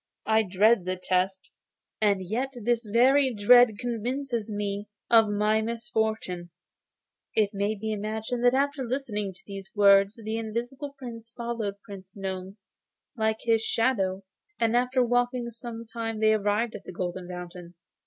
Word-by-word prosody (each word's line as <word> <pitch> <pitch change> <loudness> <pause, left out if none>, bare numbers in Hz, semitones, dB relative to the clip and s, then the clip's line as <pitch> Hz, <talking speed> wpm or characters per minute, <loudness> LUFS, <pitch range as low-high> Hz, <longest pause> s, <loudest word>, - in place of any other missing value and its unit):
I 220 0 +4
dread 205 +1 +3
the 185 0 -1
test, 185 +1 -1 0.5
and 200 -3 +2
yet 255 +7 -2
this 240 +1 +1
very 260 +2 +4
dread 225 +1 +6
convinces 240 -1 -3
me 205 0 -3 0.2
of 225 -2 +7
my 210 +1 +2
misfortune.' 220 -6 -2 0.9
It 210 -2 +3
may 200 +2 0
be 220 +1 -3
imagined 220 +3 -3
that 245 +1 +5
after 280 0 0
listening 235 -6 -2
to - - -16
these 195 -1 -8
words 200 0 +5
the 220 -1 -4
Invisible 245 +6 -5
Prince 230 -3 -9
followed 235 -4 -3
Prince 195 -3 -11
Gnome 190 0 -5 0.6
like 220 -1 0
his 225 -1 +2
shadow, 200 -5 0 0.4
and 230 0 +2
after 250 +1 +2
walking 245 0 0
some 230 0 -8
time 225 -1 -4
they 220 0 +4
arrived 215 +2 0
at - - -8
the - - -7
Golden 180 0 -4
Fountain. 180 -1 -8
220 Hz, 145 wpm, -27 LUFS, 200-240 Hz, 0.9 s, of